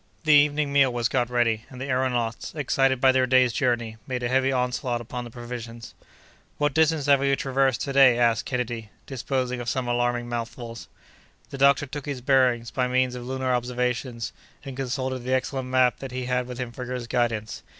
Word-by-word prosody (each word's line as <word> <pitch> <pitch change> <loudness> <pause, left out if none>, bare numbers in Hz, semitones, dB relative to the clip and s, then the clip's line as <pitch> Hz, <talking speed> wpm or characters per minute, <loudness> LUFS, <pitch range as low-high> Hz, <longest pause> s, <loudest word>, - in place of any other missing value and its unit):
The 155 -1 +4
evening 145 0 +3
meal 140 -2 +4
was 120 -1 0
got 125 -2 0
ready, 115 -3 +1
and 130 - -11
the 130 - -4
aëronauts, 125 -3 -1
excited 135 -3 +1
by 130 +1 +5
their 130 0 +2
day's 130 -2 +4
journey, 120 -3 -1
made 125 -2 -3
a 120 - 0
heavy 130 +1 +2
onslaught 125 -1 -1
upon 120 +1 -6
the - - -8
provisions. 120 -1 -8 0.6
"What 145 -1 +1
distance 160 -1 +2
have 140 -1 +5
we 140 0 +2
traversed 135 -2 0
to 140 - -3
day?" 135 -3 +6
asked 115 -2 +2
Kennedy, 120 -4 -3 0.2
disposing 130 -1 -2
of 120 - -3
some 130 -3 -2
alarming 120 0 0
mouthfuls. 115 0 -6 0.6
The 140 - -7
doctor 140 +1 +4
took 140 +1 -7
his 140 -3 -4
bearings, 125 -3 +2
by 125 -1 0
means 130 0 +1
of 125 -1 -7
lunar 130 -1 -1
observations, 125 -1 -2 0.3
and 135 -2 -7
consulted 130 0 -3
the 130 +2 0
excellent 130 0 -3
map 130 -1 +3
that 135 - -6
he 125 0 -4
had 125 0 -1
with 125 -1 -7
him 125 -2 -4
for 125 +2 -7
his 125 -1 -4
guidance. 115 -2 -1
125 Hz, 195 wpm, -25 LUFS, 120-135 Hz, 0.6 s, day